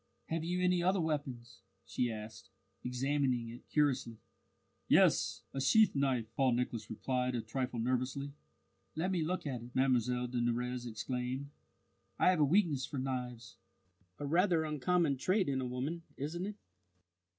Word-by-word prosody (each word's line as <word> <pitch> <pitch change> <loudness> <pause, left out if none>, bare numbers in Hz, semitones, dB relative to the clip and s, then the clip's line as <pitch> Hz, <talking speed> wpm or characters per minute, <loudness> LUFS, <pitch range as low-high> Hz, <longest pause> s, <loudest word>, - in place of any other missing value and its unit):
"Have 165 0 -1
you 180 +2 -1
any 180 -1 +3
other 185 +2 +2
weapons?" 135 - -3 0.3
she 125 -1 -1
asked, 110 -1 -8 0.3
examining 125 -1 0
it 120 +2 -11
curiously. 135 -6 +1 0.7
"Yes, - - +4
a 135 - -2
sheath 215 +10 +5
knife," 135 -5 +1
Paul 130 -1 +3
Nicholas 120 -2 -2
replied 125 +2 -1
a 120 - 0
trifle 125 +2 -3
nervously. 130 +4 -1 0.6
"Let 175 +5 0
me 180 -3 +1
look 175 +3 -1
at 130 -5 -3
it," 120 +1 -12
Mlle 125 -2 +2
de 125 0 -2
Nurrez 125 +1 -1
exclaimed. 125 +4 -3 0.7
"I - - +5
have 180 - +1
a - - +6
weakness 155 -3 +3
for 140 - -4
knives 125 -3 -4 0.6
a 145 - -4
rather 170 +2 +3
uncommon 155 0 +1
trait 185 +8 +2
in 135 -2 0
a 130 - -2
woman, 135 +7 -3 0.2
isn't 170 +7 -3
it?" 210 - -5
130 Hz, 150 wpm, -34 LUFS, 125-155 Hz, 0.7 s, a